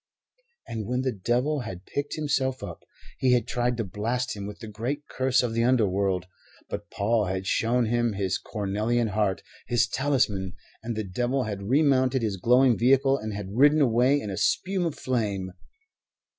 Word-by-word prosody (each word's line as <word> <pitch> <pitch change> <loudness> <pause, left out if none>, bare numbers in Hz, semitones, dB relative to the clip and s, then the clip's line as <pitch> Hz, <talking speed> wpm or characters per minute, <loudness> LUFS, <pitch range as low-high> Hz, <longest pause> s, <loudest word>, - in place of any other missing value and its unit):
And 110 -3 -5
when 125 +1 0
the 130 - 0
devil 125 +8 0
had 95 -7 -7
picked 145 0 -3
himself 135 -4 -1
up, - - -7 0.4
he 130 -1 +3
had 120 -1 +2
tried 120 0 0
to 115 - -1
blast 110 +6 -2
him 100 -1 -6
with 105 - -8
the 115 - -9
Great 120 +8 -4
Curse 130 -1 +1
of 120 -2 -1
the 115 0 +1
Underworld; 100 -7 +2 0.5
but - - -5
Paul 110 +1 +1
had 95 0 -3
shown 120 +4 +1
him 120 0 +1
his 95 -2 -1
cornelian 110 +3 -1
heart, 105 -2 0 0.2
his 120 0 +2
talisman, 125 -9 0 0.3
and 115 0 -4
the 110 - -2
devil 120 +7 -1
had 100 -3 -4
remounted 130 -3 +3
his 105 -3 -1
glowing 125 +4 +4
vehicle 135 +3 +4
and 110 0 -5
had 100 -2 -6
ridden 145 +4 +5
away 130 +1 +3
in 105 -7 -5
a 95 - -4
spume 180 +3 +1
of 160 - -4
flame. 105 -7 -2
120 Hz, 175 wpm, -26 LUFS, 105-130 Hz, 0.5 s, ridden